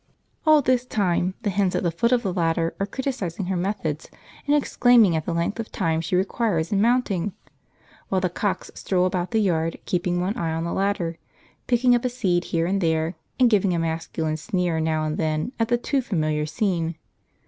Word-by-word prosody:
All 305 -2 +6
this 255 -1 +2
time 185 -5 0
the 205 - 0
hens 190 -1 +1
at - - 0
the 170 - +1
foot 235 +9 +1
of 245 -1 +3
the 190 -3 -1
ladder 165 -1 0
are 195 - 0
criticising 205 -8 -3
her 190 +1 -1
methods 175 -5 -2 0.4
and 290 - +4
exclaiming 245 - +4
at 160 -1 -2
the - - 0
length 170 +6 -1
of 225 - -5
time 165 -4 0
she 175 - -1
requires 185 -3 0
in 200 -1 +2
mounting; 210 -5 +1 0.8
while 190 - +2
the 185 - +1
cocks 190 +3 -2
stroll 180 -2 0
about 180 -1 -1
the 225 - 0
yard 165 -6 +1
keeping 175 0 0
one 185 +4 -1
eye 165 -1 -1
on 165 - -2
the 170 - -2
ladder, 185 -4 -1 0.5
picking 245 0 +4
up 240 - +2
a 250 - +1
seed 185 -8 0
here 165 -1 0
and 195 +3 0
there, 160 0 +1 0.3
and 250 -2 +5
giving 195 -4 +3
a - - 0
masculine 160 -1 -2
sneer 175 0 -1
now 160 -1 0
and 155 0 -2
then 155 +5 -1
at 225 - +2
the 240 +1 +2
too 270 +3 0
familiar 155 -9 -1
scene. 170 -1 -1
180 Hz, 205 wpm, -24 LUFS, 165-215 Hz, 0.8 s, All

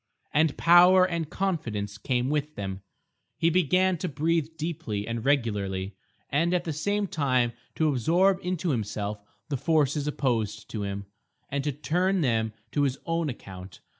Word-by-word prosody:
And 155 0 +2
power 180 +2 +7
and 170 -4 -3
confidence 115 - -2
came 125 +3 0
with 150 0 -1
them. 95 -1 -5 0.6
He 165 - +2
began 185 +1 +2
to 180 - -2
breathe 160 +1 0
deeply 130 -11 -3
and 115 -1 -3
regularly, 100 -8 0 0.4
and 170 +5 +2
at 175 - 0
the 160 - -3
same 205 +7 0
time 130 -8 +1 0.2
to 160 - +2
absorb 175 - +3
into 180 -2 -1
himself 105 -3 -3 0.3
the 140 - -1
forces 150 -1 +1
opposed 120 -8 -1
to 110 - -3
him, 100 0 -4 0.5
and 140 0 -1
to 145 - +1
turn 180 +7 0
them 110 -5 +1 0.2
to 145 - 0
his 135 -2 +1
own 165 -2 0
account. 95 -6 -9
145 Hz, 155 wpm, -27 LUFS, 110-170 Hz, 0.6 s, power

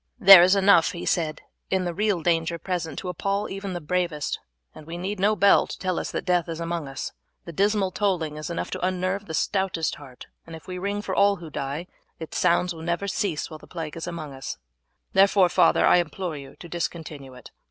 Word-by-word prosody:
"There 195 -4 +11
is 185 +3 +5
enough," 195 -3 +5
he 170 - -6
said, 155 -3 -1 0.3
"in 190 -1 0
the 175 - -2
real 200 -3 0
danger 170 0 +1
present 170 -1 -4
to 185 - -4
appall 200 +4 -2
even 195 0 -5
the 175 - -3
bravest, 170 -2 -2 0.3
and 155 - -13
we 170 +1 -6
need 190 +3 -4
no 210 +3 +3
bell 200 +1 +5
to - - -7
tell 185 -2 -1
us - - -4
that - - -4
death 180 -2 +1
is 165 0 -4
among 170 -2 -3
us. 135 0 -5 0.3
The 170 - -7
dismal 200 +1 +1
tolling 175 -7 -1
is 155 +2 -6
enough 170 - -4
to - - -4
unnerve 185 +2 -1
the 160 - -4
stoutest 190 -4 0
heart, 130 -4 -12 0.2
and 165 - -8
if 160 - -12
we 180 -1 -6
ring 200 +2 -2
for 190 - -3
all 200 +1 +4
who 170 -4 -10
die 140 +4 -4 0.3
its 160 - -5
sounds 180 0 +2
will 160 - -10
never 170 +4 -2
cease 185 -5 -2
while 155 - -8
the - - -16
plague 165 -4 -6
is 165 +1 -6
among 160 -5 -6
us; 135 0 -6 0.6
therefore, 195 -1 +5
father, - - +4
I - - +6
implore 175 0 -2
you 140 -1 -10
to 175 - -11
discontinue 160 -6 -5
it. 125 - -13
175 Hz, 220 wpm, -25 LUFS, 160-190 Hz, 0.6 s, There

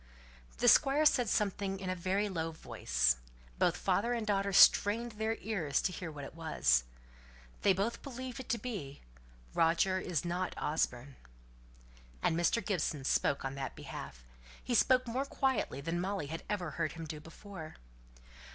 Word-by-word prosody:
The - - +1
Squire 285 +3 +6
said 245 -6 +4
something 195 -1 0
in 185 -1 -3
a - - -2
very 190 +4 0
low 165 -4 -2
voice. 60 - 0 0.4
Both - - +3
father 235 +4 +1
and 230 -2 -2
daughter 200 -1 +1
strained 220 +5 +6
their 220 +1 -1
ears 175 -10 0
to 185 - +1
hear 175 -2 -6
what 145 -2 -8
it 135 - -8
was. 70 - +2 0.8
They 200 - +5
both 205 +5 -2
believed 260 -1 -7
it 260 - -8
to 235 - +1
be, 195 - -6 0.5
"Roger 170 +3 +3
isn't 175 +1 -2
Osborne!" 140 -3 -2 1.1
And 160 - +2
Mr. 175 +6 +1
Gibson 155 -7 -1
spoke 135 +1 +1
on 135 - -3
that 135 -1 -5
belief. - - -8 0.4
He 245 - -2
spoke 255 +2 +4
more 255 +4 -1
quietly 265 - -1
than 165 +4 -2
Molly 195 -4 -2
had 160 +3 -5
ever 180 -6 -2
heard - - -2
him 165 0 -7
do 155 -1 -6
before. 165 +1 -10
185 Hz, 160 wpm, -33 LUFS, 155-220 Hz, 1.1 s, Squire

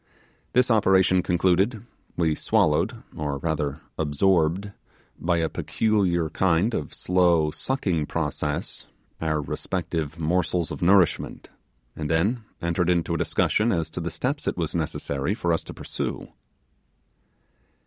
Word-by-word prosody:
This 125 0 +4
operation 95 -4 +4
concluded, 95 +6 +1 0.3
we 80 -3 +2
swallowed, - - +1
or 75 -2 -2
rather 75 0 -2 0.2
absorbed, 85 +5 +2 0.5
by 85 0 +1
a 80 -1 +1
peculiar 95 -5 +1
kind 95 +6 +2
of 75 - -3
slow 85 -4 +2
sucking 90 - -1
process, 75 -2 -3 0.3
our 80 -1 0
respective 80 0 -3
morsels 85 0 0
of - - -6
nourishment, 90 -1 +2 0.5
and 75 -1 -4
then 100 +9 +1 0.2
entered 85 +1 +1
into 85 -1 +1
a - - 0
discussion 110 +8 +2
as 85 -5 -1
to - - -5
the 85 - -2
steps 130 - -3
is - - 0
was 85 -3 -2
necessary 80 0 -2
for 85 -5 0
us 80 - -1
to - - -7
pursue. - - -4
85 Hz, 130 wpm, -25 LUFS, 80-95 Hz, 0.5 s, This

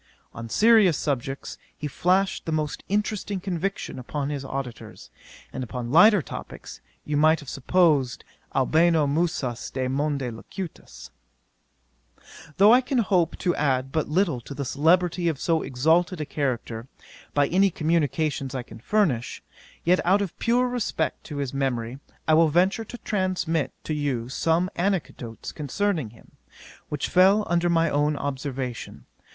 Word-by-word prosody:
On 115 0 -7
serious 215 - +5
subjects 135 -1 -3 0.2
he 150 - -6
flashed 185 +6 0
the - - -1
most 155 -3 -2
interesting 205 -1 -1
conviction 190 -4 -3
upon 140 +3 -3
his 140 -2 -4
auditors; 135 -3 -7 0.4
and 130 - -4
upon 125 0 -5
lighter 200 +3 +6
topicks, - - -9 0.3
you 150 - -2
might 155 +2 +4
have 145 - -9
supposed 145 -3 +2 0.3
Albano 160 +3 +3
musas 140 -5 -1
de 130 -1 -2
monte 140 -1 -1
locutas. 165 - -9 1.5
'Though 205 +4 +7
I 250 - +6
can 260 +1 -2
hope 185 -7 +2
to 175 - 0
add 135 -2 0
but 155 +1 -1
little 160 -6 +1
to 140 - -9
the 140 0 -3
celebrity 170 +5 +2
of 155 -5 -1
so 165 -2 +1
exalted 160 +7 +1
a 150 - -2
character, 125 -5 -3 0.5
by 145 -1 +4
any 195 +3 +4
communications 155 -4 -1
I 130 - -3
can - - -13
furnish, 140 - 0 0.4
yet 180 +2 +3
out 195 +4 +3
of 190 - -6
pure 245 +2 +2
respect 245 -3 -2
to 150 - -7
his 140 -2 -3
memory, 130 -2 -2 0.3
I 155 - +4
will 160 0 +5
venture 185 +8 +2
to 245 - -9
transmit 185 -8 -1
to 155 - -3
you 135 -6 -2
some 165 +6 +1
anecdotes 170 - -3
concerning 160 - -2
him, 115 - -19 0.6
which 150 -2 -2
fell 195 +4 +5
under 175 0 +1
my 165 -1 +3
own 145 +1 +1
observation. 135 -3 -5
155 Hz, 145 wpm, -25 LUFS, 135-180 Hz, 1.5 s, Though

